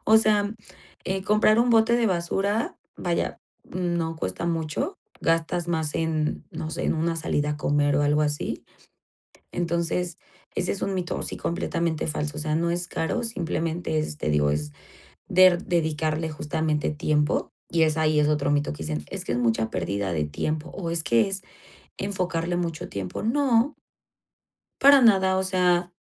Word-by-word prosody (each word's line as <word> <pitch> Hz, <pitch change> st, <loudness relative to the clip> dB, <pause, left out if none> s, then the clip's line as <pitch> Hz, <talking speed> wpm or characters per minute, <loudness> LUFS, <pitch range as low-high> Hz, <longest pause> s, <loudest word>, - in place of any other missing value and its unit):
o 220 Hz, -, +7 dB
sea, 210 Hz, -1 st, +3 dB, 0.5 s
eh, 190 Hz, 0 st, -2 dB
comprar 215 Hz, +2 st, +4 dB
un 245 Hz, +1 st, +4 dB
bote 230 Hz, 0 st, +4 dB
de 235 Hz, -2 st, +2 dB
basura, 195 Hz, +4 st, 0 dB, 0.2 s
vaya, 175 Hz, -1 st, -1 dB, 0.3 s
no 170 Hz, -3 st, -2 dB
cuesta 95 Hz, -, -3 dB
mucho, 160 Hz, -3 st, -2 dB, 0.2 s
gastas 165 Hz, +1 st, 0 dB
más 160 Hz, -3 st, -1 dB
en, 160 Hz, -2 st, -1 dB
no 160 Hz, -1 st, -5 dB
sé, -, -, -3 dB
en -, -, +2 dB
una 165 Hz, +1 st, 0 dB
salida 150 Hz, -2 st, 0 dB
a 150 Hz, -, -2 dB
comer 145 Hz, -1 st, +2 dB
o 145 Hz, -, +3 dB
algo 150 Hz, +1 st, +3 dB
así, 150 Hz, 0 st, -2 dB, 0.9 s
entonces, 170 Hz, +1 st, -1 dB, 0.4 s
ese 180 Hz, -, 0 dB
es 195 Hz, -, -7 dB
un 195 Hz, -, -1 dB
mito, 180 Hz, -2 st, -2 dB
sí, -, -, -3 dB
completamente 165 Hz, -2 st, -1 dB
falso, 150 Hz, -1 st, -2 dB
o -, -, -2 dB
sea, 155 Hz, 0 st, -1 dB
no 170 Hz, +1 st, +1 dB
es 175 Hz, 0 st, -1 dB
caro, 240 Hz, +9 st, -2 dB
simplemente 165 Hz, -5 st, -2 dB
es, 155 Hz, -1 st, -3 dB
te 75 Hz, -, -2 dB
digo, 75 Hz, -1 st, +3 dB
es 75 Hz, 0 st, -2 dB, 0.6 s
der 185 Hz, -1 st, +5 dB
dedicarle 160 Hz, -2 st, 0 dB
justamente 155 Hz, 0 st, -1 dB
tiempo 150 Hz, +1 st, 0 dB, 0.2 s
y 165 Hz, -1 st, +1 dB
es 155 Hz, 0 st, +2 dB
ahí 155 Hz, -1 st, +3 dB
es 150 Hz, -, +3 dB
otro 145 Hz, -2 st, +1 dB
mito 145 Hz, -, +1 dB
que 80 Hz, -, -7 dB
dicen: 75 Hz, -1 st, -3 dB
"Es -, -, -5 dB
que -, -, -3 dB
es -, -, 0 dB
mucha 115 Hz, -2 st, +1 dB
pérdida 95 Hz, +1 st, -2 dB
de 75 Hz, -2 st, 0 dB
tiempo, 155 Hz, -, -3 dB
o 170 Hz, -3 st, -4 dB
es 165 Hz, -1 st, 0 dB
que 115 Hz, -1 st, +3 dB
es 195 Hz, -1 st, -3 dB, 0.6 s
enfocarle 180 Hz, -3 st, -2 dB
mucho 170 Hz, -3 st, -3 dB
tiempo", 95 Hz, -, -5 dB
no 250 Hz, +2 st, +2 dB, 1.0 s
para 280 Hz, 0 st, +8 dB
nada, 190 Hz, -4 st, +5 dB
o 190 Hz, -, +1 dB
sea, 180 Hz, -1 st, +2 dB
165 Hz, 170 wpm, -25 LUFS, 150-185 Hz, 1.0 s, para